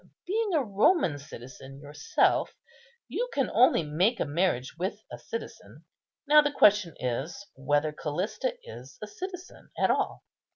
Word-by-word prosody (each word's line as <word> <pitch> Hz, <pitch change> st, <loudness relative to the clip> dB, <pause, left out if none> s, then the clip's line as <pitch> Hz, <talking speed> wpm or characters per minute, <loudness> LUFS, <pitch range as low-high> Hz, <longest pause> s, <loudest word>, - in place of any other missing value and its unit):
Being 415 Hz, -1 st, 0 dB
a 295 Hz, -, +2 dB
Roman 205 Hz, -, +2 dB
citizen 135 Hz, 0 st, -11 dB
yourself, 150 Hz, -, 0 dB, 0.5 s
you -, -, -3 dB
can 275 Hz, -, 0 dB
only 230 Hz, -6 st, +4 dB
make 180 Hz, +11 st, +1 dB
a -, -, 0 dB
marriage 145 Hz, -4 st, -1 dB
with 185 Hz, +4 st, -3 dB
a -, -, -8 dB
citizen; 460 Hz, -, -8 dB, 0.4 s
now 300 Hz, +1 st, +8 dB
the 290 Hz, 0 st, 0 dB
question 205 Hz, -, +4 dB
is 135 Hz, +10 st, -3 dB
whether 145 Hz, +3 st, 0 dB
Callista 185 Hz, -, -3 dB
is 485 Hz, -, -11 dB
a -, -, -2 dB
citizen 375 Hz, -3 st, -9 dB
at -, -, +3 dB
all. -, -, -1 dB
195 Hz, 140 wpm, -28 LUFS, -, 0.5 s, now